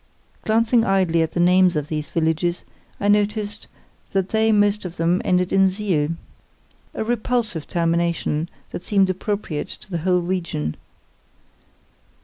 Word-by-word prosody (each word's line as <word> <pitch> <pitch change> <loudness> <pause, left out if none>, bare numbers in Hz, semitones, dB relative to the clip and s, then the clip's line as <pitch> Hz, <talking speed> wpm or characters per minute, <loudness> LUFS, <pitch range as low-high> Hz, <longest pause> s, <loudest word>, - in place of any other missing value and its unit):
Glancing 225 +1 +3
idly 185 -5 +2
at 160 - -1
the - - -2
names 180 0 +4
of 150 -1 -1
these 150 -2 -4
villages, 165 +2 0 0.4
I 200 - -1
noticed 210 +1 0 0.5
that 195 -1 0
they 220 0 +2
most 205 0 +2
of 180 -2 -7
them 170 +2 +1
ended 180 0 +1
in 195 0 +5
siel—a 180 0 -5
repulsive 230 -6 -1
termination, 170 -1 0 0.2
that - - -5
seemed 195 -1 +2
appropriate 190 -5 -3
to 210 +1 -12
the 170 - -1
whole 180 +2 +2
region. 170 - -2
185 Hz, 130 wpm, -22 LUFS, 165-205 Hz, 0.5 s, in